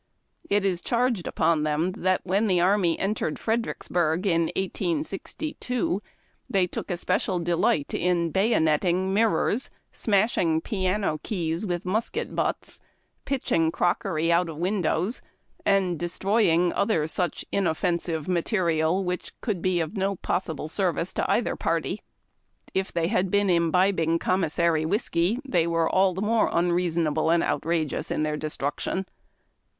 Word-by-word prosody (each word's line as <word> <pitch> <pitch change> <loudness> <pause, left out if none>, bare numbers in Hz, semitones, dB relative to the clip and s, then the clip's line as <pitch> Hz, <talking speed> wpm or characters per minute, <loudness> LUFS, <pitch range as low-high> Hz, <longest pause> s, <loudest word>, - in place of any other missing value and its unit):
It 205 -1 +2
is 180 -3 0
charged 235 -6 0
upon 165 -2 +1
them 155 +4 0 0.3
when 195 +4 +1
the 185 -3 +3
army 180 -2 +3
entered 195 -5 -1
Fredericksburg, 180 -6 -1
in 170 -3 +2
1862, 195 - -2
that 200 +3 -3 0.5
they 190 -2 +2
took 180 - -6
especial 180 +1 0
delight 175 -1 +1
in 170 -2 +1
bayonetting 185 -2 +2
mir 220 +2 +4
rors, 235 +4 0 0.2
smashing 195 -6 +1
piano 190 -5 -1
keys 170 -1 -2
with 175 -1 -2
musket 225 - -2
butts, - - -2 0.5
pitching 245 -12 +1
crock 175 +1 +1
ery 165 -3 0
out 170 0 +2
of 155 - -7
windows, 185 +3 0 0.5
and 190 -4 +2
destroying 175 -1 +2
other 180 -8 +1
such 175 +2 -2
inoffensive 170 -3 -1
material, 175 -1 +1
which 180 0 -4
could 205 -8 -2
be 185 -1 +1
of 165 +5 -3
no 195 0 0
possible 165 -4 -3
service 175 0 -1
to - - -1
either - - +1
party. - - -1 0.7
If 190 0 -1
they 170 -1 0
had 190 -3 +1
been 205 0 +2
imbibing 170 0 +2
commissary 170 -2 +1
whiskey, 185 +3 0
they 170 -8 +2
were 165 -1 +1
all 190 -1 +2
the 190 - -2
more 225 +1 +2
unreasonable 170 -3 +1
and 170 0 +3
outrageous 160 -2 -1
in 155 - -1
their 150 0 -1
destruction. 150 +5 -3
180 Hz, 135 wpm, -26 LUFS, 165-195 Hz, 0.7 s, mir